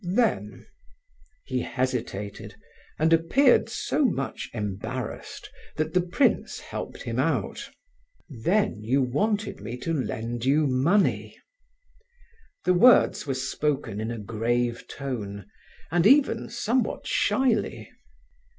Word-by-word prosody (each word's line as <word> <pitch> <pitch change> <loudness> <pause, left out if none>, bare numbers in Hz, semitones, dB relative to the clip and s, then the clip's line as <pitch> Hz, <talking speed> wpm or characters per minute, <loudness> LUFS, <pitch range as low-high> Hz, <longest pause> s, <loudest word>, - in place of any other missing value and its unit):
then..." 240 0 0 0.8
He 130 -1 -2
hesitated, 105 -6 -3 0.4
and 160 +1 +3
appeared 240 - +4
so 305 - -1
much 135 - -1
embarrassed 110 +3 -5 0.3
that 155 +1 -1
the 180 - +4
prince 180 +11 +1
helped - - -7
him - - -3
out. - - -1 0.6
"Then 145 - 0
you 130 +5 +2
wanted 205 - -1
me 115 +4 -6
to 165 +6 -3
lend 120 -4 -3
you 145 +4 +3
money?" 145 +10 +1 1.3
The 180 - +4
words 215 -3 +5
were 135 - -1
spoken 130 -4 -2
in 110 - -3
a 120 - -4
grave 115 +3 -1
tone, 105 -8 -5 0.5
and 175 +2 +4
even 265 -3 +4
somewhat 240 +3 -1
shyly. 245 -5 0
135 Hz, 110 wpm, -26 LUFS, 120-180 Hz, 1.3 s, words